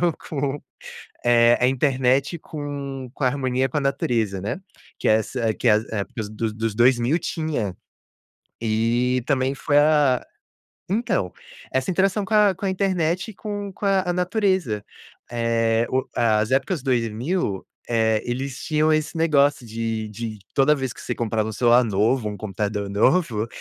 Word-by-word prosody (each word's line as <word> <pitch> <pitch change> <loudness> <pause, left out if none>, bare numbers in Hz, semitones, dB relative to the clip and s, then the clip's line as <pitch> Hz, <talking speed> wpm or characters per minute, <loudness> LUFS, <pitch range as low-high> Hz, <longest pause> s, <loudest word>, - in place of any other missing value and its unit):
interação 175 -2 +3 0.2
com, 140 -1 -2 0.6
eh, 120 0 +5
a 125 - +4
internet 135 +3 +1
com 140 -4 -6
com 145 - -3
a - - +4
harmonia 130 -1 0
com 150 - -1
a - - 0
natureza, 115 -7 0
né, 105 - -4 0.4
que - - 0
é - - +6
essa 110 +1 0
que 120 - 0
a 105 - +7 0.2
época 110 +2 -3
dos 110 0 -3
dos 110 -1 -2
2000 125 +5 +3
tinha, 145 - -3 0.9
e 115 +3 +1
também 135 -1 +1
foi 145 +1 +1
a 145 -4 +3 0.7
então, 185 - 0 0.4
essa 130 +7 0
interação 195 +3 +1
com 205 - -7
a 210 -2 +5
com 200 - -8
a 195 - +1
internet 185 0 0
e - - -12
com 205 0 -5
com - - -7
a 195 -1 +3
a - - +2
natureza. 180 - 0 0.5
Eh, 115 -1 +1
o 130 +1 +1
as 110 -1 +2
épocas 140 +3 0
2000, 120 - -1 0.2
eh, 110 -2 +2
eles 130 +2 -4
tinham 155 0 +2
esse 155 +1 0
negócio 145 -5 +2
de 110 -1 -3
de 110 0 -6 0.2
toda 140 +2 +4
vez 135 -4 -3
que - - -13
você - - -3
comprava 110 -2 -1
um - - -4
celular 120 +2 +4
novo, 110 +2 +1
um 105 - -5
computador 105 0 -3
novo, 115 - +2
130 Hz, 165 wpm, -23 LUFS, 115-155 Hz, 0.9 s, a